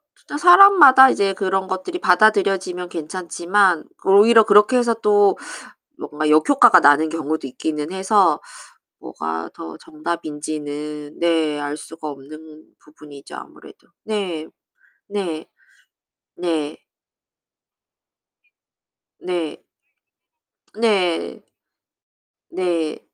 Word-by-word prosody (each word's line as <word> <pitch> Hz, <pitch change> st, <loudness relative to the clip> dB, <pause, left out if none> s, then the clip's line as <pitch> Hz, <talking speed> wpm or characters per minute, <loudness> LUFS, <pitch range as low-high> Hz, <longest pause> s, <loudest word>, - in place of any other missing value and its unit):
진짜 290 Hz, -, -9 dB
사람마다 350 Hz, -7 st, +7 dB
이제 200 Hz, -5 st, 0 dB
그런 190 Hz, -1 st, -2 dB
것들이 190 Hz, -, -5 dB
받아들여지면 190 Hz, -, +1 dB
괜찮지만 175 Hz, +2 st, -1 dB, 0.2 s
오히려 215 Hz, +4 st, +5 dB
그렇게 210 Hz, +4 st, +4 dB
해서 240 Hz, -1 st, +1 dB
또 205 Hz, -1 st, +3 dB, 0.6 s
뭔가 150 Hz, +1 st, -4 dB
역효과가 185 Hz, -, +5 dB
나는 155 Hz, 0 st, +3 dB
경우도 160 Hz, -1 st, -4 dB
있기는 150 Hz, +4 st, -5 dB
해서 190 Hz, -4 st, +1 dB, 0.6 s
뭐가 80 Hz, +1 st, -6 dB
더 80 Hz, -1 st, -10 dB
정답인지는 150 Hz, -2 st, -7 dB
네. 160 Hz, -3 st, 0 dB
알 145 Hz, 0 st, -5 dB
수가 160 Hz, 0 st, -11 dB
없는 155 Hz, +3 st, -14 dB
부분이죠, 150 Hz, -2 st, -15 dB
아무래도. -, -, -15 dB, 0.2 s
네. 185 Hz, -7 st, -5 dB, 0.6 s
네. 185 Hz, -6 st, -5 dB, 0.9 s
네. 160 Hz, -4 st, -4 dB, 2.4 s
네. 175 Hz, -4 st, -5 dB, 1.2 s
네. 200 Hz, -7 st, -1 dB, 1.1 s
네. 170 Hz, -4 st, -3 dB
170 Hz, 195 characters per minute, -19 LUFS, 155-200 Hz, 2.4 s, 사람마다